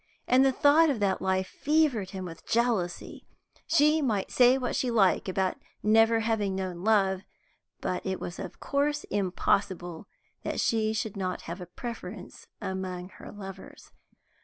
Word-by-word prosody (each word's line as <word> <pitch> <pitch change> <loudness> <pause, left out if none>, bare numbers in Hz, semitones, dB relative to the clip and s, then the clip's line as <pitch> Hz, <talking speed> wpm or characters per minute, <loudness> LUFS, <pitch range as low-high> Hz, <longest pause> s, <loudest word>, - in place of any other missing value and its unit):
And 255 +1 +5
the 270 - +4
thought 295 +5 +5
of 265 -6 0
that 200 -2 +1
life 190 0 +1
fevered 285 -9 +1
him 190 -1 -6
with 165 -2 -10
jealousy. 225 -7 -1 0.4
She 310 -1 +4
might 215 -8 -1
say 250 +1 +5
what 250 -2 -2
she 265 -3 0
liked 200 -4 +3
about 185 0 0 0.3
never 225 +1 +4
having 215 -4 0
known 185 -2 -4
love, 195 -3 +3 0.6
but 180 - -2
it 190 -1 -2
was 175 - -6
of - - -7
course 290 +1 0
impossible 185 -2 -1 0.3
that - - -3
she 220 -1 +1
should 220 -1 -3
not 185 -2 -3
have 170 +3 -7
a 180 - -7
preference 225 0 -8
among 185 -1 -4
her - - -12
lovers. 195 -2 -10
205 Hz, 155 wpm, -28 LUFS, 190-245 Hz, 0.6 s, And